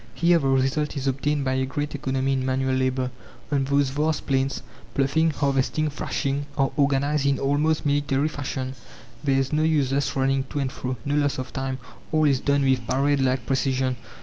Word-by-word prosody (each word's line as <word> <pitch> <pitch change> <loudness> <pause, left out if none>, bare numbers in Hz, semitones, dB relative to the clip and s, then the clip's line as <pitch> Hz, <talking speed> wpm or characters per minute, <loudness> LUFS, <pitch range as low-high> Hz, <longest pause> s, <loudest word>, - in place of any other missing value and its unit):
Here 170 0 +4
the 135 - -1
result 135 +3 +1
is 135 - -3
obtained 140 +2 0
by 130 - +1
a 130 0 +1
great 145 +2 -3
economy 135 -1 -1
in 130 -1 0
manual 130 0 0
labour: 130 -1 0 0.4
on 140 -2 +1
those 140 0 +2
vast 150 +1 0
plains, 135 0 0 0.3
ploughing, 145 +4 +2
harvesting, 145 +1 0
thrashing, 140 0 -2
are 135 0 +2
organized 140 0 +2
in 140 -1 +2
almost 150 +3 +1
military 145 0 +1
fashion. 135 -3 -4 0.5
There 135 -2 +2
is 135 +2 0
no 155 - +2
useless 145 -3 +1
running 135 0 +1
to - - -5
and 135 -2 -1
fro, 130 -1 -4
no 140 - -1
loss 145 -1 +1
of 130 0 -5
time 130 0 -2 0.3
all 155 -1 +3
is 135 -3 +3
done 140 0 +1
with 125 -4 +1
parade 140 +2 +2
like 130 0 +1
precision. 130 -1 0
135 Hz, 185 wpm, -24 LUFS, 130-145 Hz, 0.5 s, Here